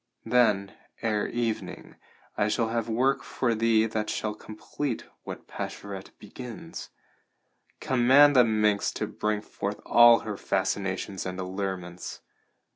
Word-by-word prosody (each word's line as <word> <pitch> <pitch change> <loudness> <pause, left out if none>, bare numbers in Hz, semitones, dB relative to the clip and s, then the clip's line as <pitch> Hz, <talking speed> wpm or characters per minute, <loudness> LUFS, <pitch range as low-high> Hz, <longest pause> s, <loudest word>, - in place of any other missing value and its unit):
Then, 105 -5 +2 0.3
ere 105 -2 0
evening, 115 -2 -4 0.4
I 105 - +1
shall 115 +1 0
have 115 0 -2
work 130 +5 +2
for 120 -3 -1
thee 110 0 +3
that 110 -1 -2
shall 110 -1 -2
complete 110 +5 -5 0.2
what - - -7
Pascherette 100 -2 -7
begins. - - -9 0.9
Command 135 +3 +5
the 125 - +8
minx 105 -3 +2
to - - -2
bring 105 -1 -2
forth - - -5
all 120 0 +7
her 105 -2 -5
fascinations 95 0 -2
and 90 0 -5
allurements. 95 -1 -5
110 Hz, 120 wpm, -27 LUFS, 100-120 Hz, 0.9 s, the